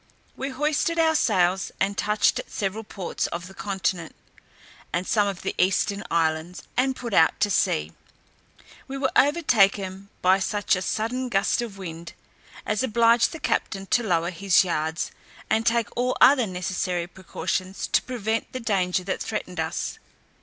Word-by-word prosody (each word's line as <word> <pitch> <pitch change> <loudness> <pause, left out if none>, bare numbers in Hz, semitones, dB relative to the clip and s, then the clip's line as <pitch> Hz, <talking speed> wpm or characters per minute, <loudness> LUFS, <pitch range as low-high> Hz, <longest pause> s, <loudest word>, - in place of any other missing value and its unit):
We 270 - -4
hoisted 300 +5 0
our 320 -1 +4
sails, 190 - +2
and 200 +1 +1
touched 210 +1 +2
at - - -8
several 205 +2 -3
ports 195 -4 -3
of 170 +1 -5
the 190 - -11
continent, 190 -4 -3 0.8
and 175 +2 -1
some 205 0 +2
of 195 -3 -4
the - - -2
eastern 195 +2 +1
islands, 165 +1 0
and 260 +1 +2
put 235 -4 -6
out 160 -3 +4
to 205 - +3
sea: 75 - +1 1.0
we 270 - -5
were 270 0 0
overtaken 200 - +3
by 185 +1 +5
such 205 +1 +1
a 185 - -3
sudden 245 +6 -2
gust 200 +3 +1
of 225 -5 -6
wind, 170 -3 -8 0.5
as 210 0 0
obliged 235 -1 +4
the 325 - -7
captain 195 -9 -1
to 245 - +4
lower 175 -5 0
his 190 +1 +3
yards, 160 -2 -2 0.4
and 225 +1 +2
take 230 -1 +1
all 250 +1 0
other 255 -3 +6
necessary 180 -1 -2
precautions 185 +1 -4
to - - +2
prevent 225 -3 -3
the 255 - -3
danger 190 -5 0
that 190 +1 -3
threatened - - -4
us. - - -3
200 Hz, 160 wpm, -25 LUFS, 180-235 Hz, 1.0 s, other